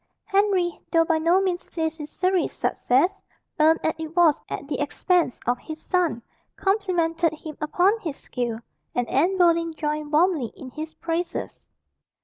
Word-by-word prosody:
Henry, 390 -4 +1
though 330 -1 +4
by 325 -1 +2
no 340 +4 +4
means 370 -2 -2
pleased 320 -1 -2
with 300 0 -6
Surrey's 370 +2 0
success, 275 +10 +1 0.4
earned 320 +2 +5
as 315 - +1
it 320 0 -6
was 330 -4 +5
at - - -5
the 295 - -3
expense 325 0 +1
of 245 0 +1
his 315 +3 -8
son, 345 -10 0 0.3
complimented 350 -5 +1
him 310 -1 -8
upon 365 +8 +2
his 320 -9 -5
skill, 240 -3 -3 0.4
and 245 -1 0
Anne 345 +8 +2
Boleyn 335 -2 +3
joined 300 -1 -3
warmly 310 -6 +2
in 260 -2 -10
his 310 +3 -7
praises. 335 +1 -4
330 Hz, 155 wpm, -24 LUFS, 300-360 Hz, 0.4 s, earned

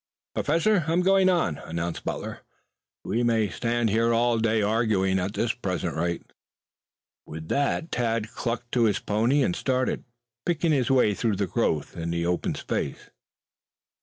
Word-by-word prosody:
"Professor, 170 +5 +2
I'm 165 +3 +2
going 190 0 +4
on," 165 - +1
announced 85 +1 -4
Butler. - - -4 0.6
"We 115 - -1
may 115 -3 +2
stand 115 +3 0
here 115 +2 +2
all 115 0 +2
day 110 0 +2
arguing 100 -3 +2
at 95 +3 -3
the 120 0 +1
present 90 -3 -2
rate." 85 +1 -1 1.0
With 80 +1 -8
that 145 +3 0
Tad 115 -2 -1
clucked 120 0 -4
to 120 -2 +3
his 105 -3 +2
pony 115 +9 +1
and 180 - 0
started, 130 -4 0 0.4
picking 170 -1 +1
his 130 -5 +2
way 125 -6 +4
through 110 0 0
the 100 +1 0
growth 85 -7 -1
in 85 -1 -4
the 85 0 -1
open 90 0 -1
space. - - -4
115 Hz, 155 wpm, -26 LUFS, 95-130 Hz, 1.0 s, going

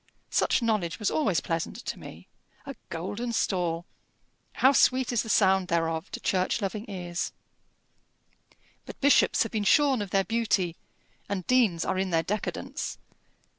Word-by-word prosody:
Such - - +2
knowledge 210 -7 0
was 210 - -1
always 210 - +1
pleasant 165 +3 -3
to - - -4
me! - - -11 0.4
A 275 - -6 0.2
golden 205 +8 -4
stall! 175 -6 0 0.7
How 265 - +5
sweet 260 -2 +3
is 235 - +2
the 225 - -7
sound 190 -3 +3
thereof 165 0 -1
to - - -6
church 185 +4 0
loving 210 +2 -4
ears! 175 -3 -4 1.6
But - - -9
bishops 285 -1 +4
have 225 - -6
been 215 -2 -1
shorn 270 +2 +4
of 205 - -4
their 195 +1 +2
beauty, 210 -6 0 0.5
and 190 -3 -3
deans 225 -10 +2
are 185 - -1
in 190 0 0
their 165 -2 +1
decadence. 210 +5 -4
195 Hz, 150 wpm, -27 LUFS, 175-230 Hz, 1.6 s, How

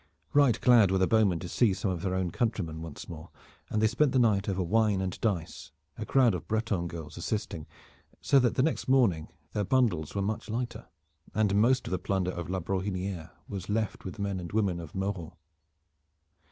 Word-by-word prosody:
Right 140 -6 +4
glad 120 -6 +6
were 95 - +2
the 95 - +3
bowmen 105 -4 +3
to 90 - -5
see 100 +2 +2
some 100 -1 -1
of 90 -3 -3
their 95 -1 -1
own 95 -2 -1
countrymen 90 -9 -2
once 80 -3 -8
more, 80 0 -9 0.4
and 110 - 0
they 110 - +3
spent 130 +5 +2
the - - +3
night 105 -5 +3
over 95 -1 0
wine 105 +2 +2
and 95 -1 -3
dice, 85 -7 -2 0.2
a 110 - -6
crowd 125 -5 +4
of 85 -5 -5
Breton 110 -5 -1
girls 85 -2 -8
assisting, 85 -4 -3 0.5
so 140 - +4
that 125 -3 +1
next 150 +5 +1
morning 115 -12 +3 0.3
their 105 - 0
bundles 100 - +1
were 100 - 0
much 105 +3 -3
lighter, 120 +2 -4 0.5
and 105 -2 +2
most 120 +6 +3
of - - -5
the 95 - 0
plunder 95 -2 -1
of 85 -2 -6
La 95 0 -1
Brohiniere 95 -1 -3 0.2
was 95 -1 -6
left 110 0 -1
with 95 - -6
the 100 - -4
men 100 -2 -2
and 85 -1 -7
women 100 -5 +1
of 85 -3 -9
Mauron. 95 -4 -3
100 Hz, 200 wpm, -29 LUFS, 90-110 Hz, 0.5 s, glad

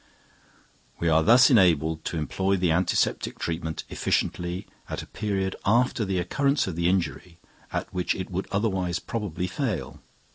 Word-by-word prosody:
We 85 - +1
are 80 0 +4
thus 120 - +6
enabled 80 - +3
to 85 - -2
employ 95 +5 0
the 90 -2 +1
antiseptic 90 +2 +1
treatment 80 -1 -3
efficiently 90 +1 -1 0.2
at - - -4
a - - -10
period 95 -2 -2
after 115 +1 +2
the 95 -1 -1
occurrence 140 - +1
of 95 - -4
the 85 +1 +1
injury 85 -1 -2 0.3
at - - -4
which 90 -1 0
it 95 0 -5
would 95 +2 -3
otherwise 95 -4 0
probably 100 -6 -4
fail. 105 - -3
90 Hz, 150 wpm, -26 LUFS, 85-100 Hz, 0.3 s, thus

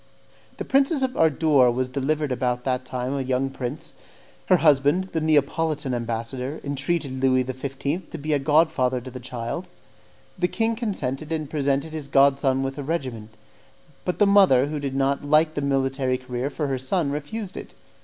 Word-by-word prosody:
The - - -5
Princess 275 +1 +2
of 260 0 -1
Ardore 150 -4 +4
was 125 +2 0
delivered 140 +2 -1
about 125 0 -1
that 130 -1 -1
time 125 +1 -3
of 140 - -2
a - - -1
young 130 +1 -1
prince. 135 +2 -5 0.5
Her 185 - +5
husband, 150 +4 +3
the 160 - 0
Neapolitan 155 -1 +1
ambassador, 120 +4 -3
entreated 140 -1 -2
Louis 130 -1 +3
XV. 135 +6 -4
to - - -6
be 150 0 -1
god 155 +3 +3
father 130 -3 0
to 130 +1 -9
the 125 - -7
child; 125 +7 -5 0.7
the 180 - +2
king 225 +4 0
consented 155 - -3
and 155 -2 -2
presented 140 +1 -1
his 155 -3 -5
god 140 0 +4
son 135 -1 +1
with 135 +1 -4
a - - -3
regiment; 130 -8 -4 0.7
but 180 - -2
the 205 - +5
mother, 195 -11 +5
who 150 +1 -4
did 140 -2 -4
not 140 +1 +1
like 155 +2 +3
the 145 - -2
military 135 -2 0
career 130 +1 -4
for 150 +1 -3
her 135 -2 -1
son, 140 +3 0
refused 180 +8 -5
it. - - -9
140 Hz, 180 wpm, -24 LUFS, 130-155 Hz, 0.7 s, Her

